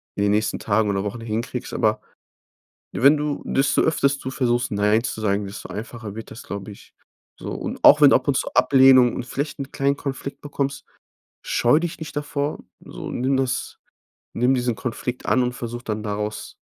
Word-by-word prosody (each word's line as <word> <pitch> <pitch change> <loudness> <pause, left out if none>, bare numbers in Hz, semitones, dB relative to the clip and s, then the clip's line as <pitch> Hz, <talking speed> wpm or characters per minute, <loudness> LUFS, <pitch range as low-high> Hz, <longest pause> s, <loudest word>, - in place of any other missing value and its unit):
in 100 - 0
den 100 - +2
nächsten 105 +1 0
Tagen 105 0 +1
oder 100 -1 0
Wochen 105 +3 -4
hinkriegst, 115 +3 -4
aber 110 -1 +1 0.9
wenn 140 +4 +5
du 150 -1 -2
desto 135 +1 +2
öfters 140 -3 +2
du 130 -1 -6
versuchst, 120 -3 0
nein 105 +2 +2
zu 110 - -4
sagen, 100 -1 0
desto 100 +1 -8
einfacher 110 -1 -7
wird 115 - -8
das, 120 - -9
glaube 100 -6 -6
ich. 100 - -15 0.5
So, - - -6
und - - -5
auch 150 +1 +8
wenn 145 -1 +8
ab 130 - +3
und 140 - +2
zu - - -1
Ablehnung 130 -1 +6
und 125 - -4
vielleicht 145 +3 -4
'n 135 0 -6
kleinen 140 +1 +1
Konflikt 140 -1 -6
bekommst, 140 -1 -3 0.6
scheue 120 +6 +3
dich 170 -1 -4
nicht 160 - -8
davor, 145 0 -2 0.2
so. - - -8
Nimm 130 +2 0
das 130 -2 -2 0.5
nimm 125 +3 +2
diesen 125 -2 0
Konflikt 125 +1 -4
an 130 - +3
und 125 0 -1
versuch 120 0 -6
dann 110 -2 -4
daraus 105 0 -4
125 Hz, 185 wpm, -23 LUFS, 110-140 Hz, 0.9 s, auch